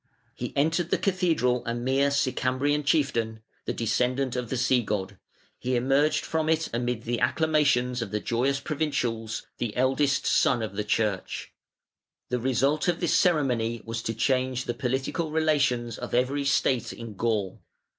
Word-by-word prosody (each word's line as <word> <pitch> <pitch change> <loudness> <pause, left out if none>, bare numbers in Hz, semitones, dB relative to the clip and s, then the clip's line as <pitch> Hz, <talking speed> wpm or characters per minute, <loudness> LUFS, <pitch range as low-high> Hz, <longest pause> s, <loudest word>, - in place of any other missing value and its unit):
He - - -5
entered 165 +4 +1
the - - +2
cathedral 165 - +1
a 115 - -2
mere 135 +4 +1
"Sicambrian" 140 +1 0
chieftain, 120 -7 0 0.2
the - - -1
descendant 125 +3 0
of 125 -2 -3
the 130 - -2
sea 125 0 +3
god: 100 -3 -3 0.4
he 125 +1 -1
emerged 135 +5 +2
from 160 -1 -1
it 160 0 +2
amid 120 -1 -1
the 120 0 -2
acclamations 130 -3 +2
of 115 - -3
the 105 - -2
joyous 130 +6 0
provincials, 125 -7 -2
"the 115 -3 -3
eldest 135 +2 +2
son 120 -3 +3
of 110 - -4
the 105 - -1
Church". 105 -2 -1 0.8
The 125 - 0
result 130 +6 +1
of 175 -2 +1
this 175 - +1
ceremony 125 - +1
was 115 0 -4
to 115 0 -3
change 130 +1 0
the 120 - -2
political 130 +7 -2
relations 140 -7 +1
of 125 - -4
every 135 +3 +1
state 135 -3 +1
in 115 -2 -8
Gaul. 105 -2 -1
125 Hz, 155 wpm, -27 LUFS, 115-145 Hz, 0.8 s, sea